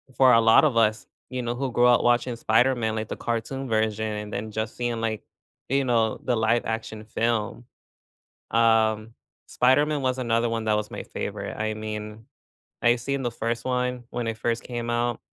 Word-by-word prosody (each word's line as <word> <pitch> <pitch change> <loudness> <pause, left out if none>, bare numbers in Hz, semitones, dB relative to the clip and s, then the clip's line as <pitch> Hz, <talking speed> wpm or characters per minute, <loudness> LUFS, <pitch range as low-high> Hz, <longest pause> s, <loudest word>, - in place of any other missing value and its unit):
for 130 -1 +6
a 115 - +7
lot 115 +5 +6
of 140 -7 +2
us, 110 -1 +2 0.2
you 130 0 -3
know, 120 0 -2
who 135 +1 -2
grew 120 +1 +4
up 120 -1 +4
watching 120 0 +2
Spider-Man, 115 0 +2
like 110 -1 -3
the - - -3
cartoon 120 +4 -3
version, 110 -1 0
and 105 -1 -4
then 110 +1 -4
just 110 +1 -4
seeing, 120 -2 -2
like, 110 -2 -2 0.5
you 135 +2 +2
know, 115 -4 +1
the 125 - +1
live 110 +2 +2
action 110 -1 -4
film. 115 +1 -2 0.9
Um, 110 -1 +2 0.3
Spider-Man 145 +4 +2
was 130 -1 0
another 120 -2 +1
one 115 -1 -2
that 110 -1 +2
was 105 0 -3
my - - -6
favorite. 100 -1 -5
I 110 0 -1
mean, 105 0 -6 0.6
I 120 0 +5
seen 140 +3 -3
the 120 - -1
first 115 0 -3
one 125 -1 -1
when 120 -1 -3
it 115 - -3
first 115 +1 -1
came 120 -1 -4
out 120 0 0
115 Hz, 190 wpm, -25 LUFS, 110-125 Hz, 0.9 s, a